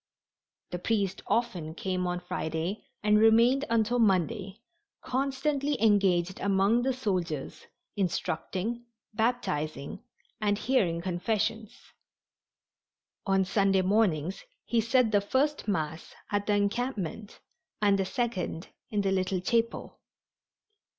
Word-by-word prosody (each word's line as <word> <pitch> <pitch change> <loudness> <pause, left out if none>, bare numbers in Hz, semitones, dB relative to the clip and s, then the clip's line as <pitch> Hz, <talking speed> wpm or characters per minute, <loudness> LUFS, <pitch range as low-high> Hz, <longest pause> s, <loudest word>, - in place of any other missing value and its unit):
The 180 - -3
priest 200 -1 -1
often 175 -9 -1
came 185 0 -2
on 180 0 -2
Friday 170 +2 -3 0.2
and 210 0 +4
remained 235 +5 +5
until 230 +1 +2
Monday, 195 -1 +1 0.4
constantly 275 +2 -1
engaged 190 -4 +3
among 200 +4 +3
the 265 +2 +1
soldiers, 185 - -3 0.3
instructing, 195 +5 -2 0.3
baptizing 195 - -2 0.4
and 205 -1 +1
hearing 195 -10 +1
confessions. 215 +4 -2 1.5
On 195 -1 +3
Sunday 195 0 +2
mornings 185 -4 +1 0.2
he 235 -1 +2
said 230 0 +3
the 205 -1 +4
first 275 +8 0
Mass 160 -5 -3 0.2
at 205 0 0
the 205 - +3
encampment 205 -1 -2 0.4
and 200 -1 +3
the 195 - +1
second 200 -6 -3 0.2
in 210 -2 0
the 195 -1 0
little 185 0 0
chapel. 230 +5 -1
205 Hz, 110 wpm, -29 LUFS, 185-230 Hz, 1.5 s, remained